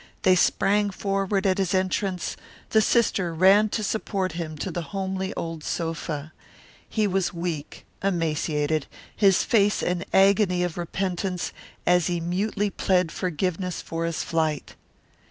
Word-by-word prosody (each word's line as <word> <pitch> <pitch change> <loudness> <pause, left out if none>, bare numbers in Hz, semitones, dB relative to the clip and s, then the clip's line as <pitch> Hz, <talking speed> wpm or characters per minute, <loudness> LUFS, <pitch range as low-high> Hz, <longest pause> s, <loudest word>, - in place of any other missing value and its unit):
They 185 - +6
sprang 205 +3 +2
forward 195 0 -1
at 190 0 +2
his 190 -1 +1
entrance; 185 -1 -1 0.4
the 220 - +5
sister 195 -7 +2
ran 195 +5 +5
to 215 - -2
support 195 -3 -1
him 160 -2 -5
to 180 +6 -3
the 175 - -3 0.2
homely 190 0 -2
old 165 -2 -5
sofa. 160 -2 -3 0.6
He 215 -2 +1
was 190 -2 0
weak, 170 -4 -4 0.2
emaciated, 155 -4 0 0.3
his 195 -3 +4
face 205 -2 +2
an 180 0 0
agony 195 -2 +4
of 175 -2 -2
repentance, 180 +1 -2 0.3
as 180 -1 +4
he 175 -1 0
mutely 200 +4 -1
pled 180 -4 +1
forgiveness 180 0 -2
for 165 0 -3
his 165 -1 -2
flight. 160 -3 -1
180 Hz, 135 wpm, -25 LUFS, 165-195 Hz, 0.6 s, They